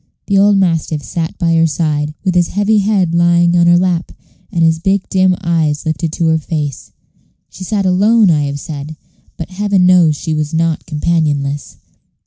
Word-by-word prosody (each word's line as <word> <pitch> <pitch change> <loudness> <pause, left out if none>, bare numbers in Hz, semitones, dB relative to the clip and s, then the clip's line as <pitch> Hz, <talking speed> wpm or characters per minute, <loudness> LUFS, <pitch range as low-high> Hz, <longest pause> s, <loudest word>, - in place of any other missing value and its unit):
The 200 - +1
old 200 0 +4
mastiff 165 -5 -1
sat 165 +2 -4
by 165 -1 0
her 165 0 +3
side, 150 -1 -2
with 185 -2 0
his 175 -1 +2
heavy 205 +2 +1
head 195 -4 0
lying 170 0 +3
on 170 -1 +3
her 175 0 +5
lap, 175 -1 -1 0.4
and 170 - 0
his 160 0 +2
big 190 +3 -1
dim 185 -1 +2
eyes 160 -4 -1
lifted 160 0 -2
to 170 - -1
her 160 0 +2
face. 150 -3 -5 0.6
She 190 - -10
sat 200 +1 -2
alone, 200 +2 +3
I 150 -2 +1
have 140 0 -4
said; 150 0 -7 0.4
but 165 +2 -7
Heaven 200 -1 +1
knows 175 -4 +4
she 160 - -4
was 155 +1 -2
not 165 -1 -1
companionless. 150 -3 -2
170 Hz, 180 wpm, -14 LUFS, 155-185 Hz, 0.6 s, her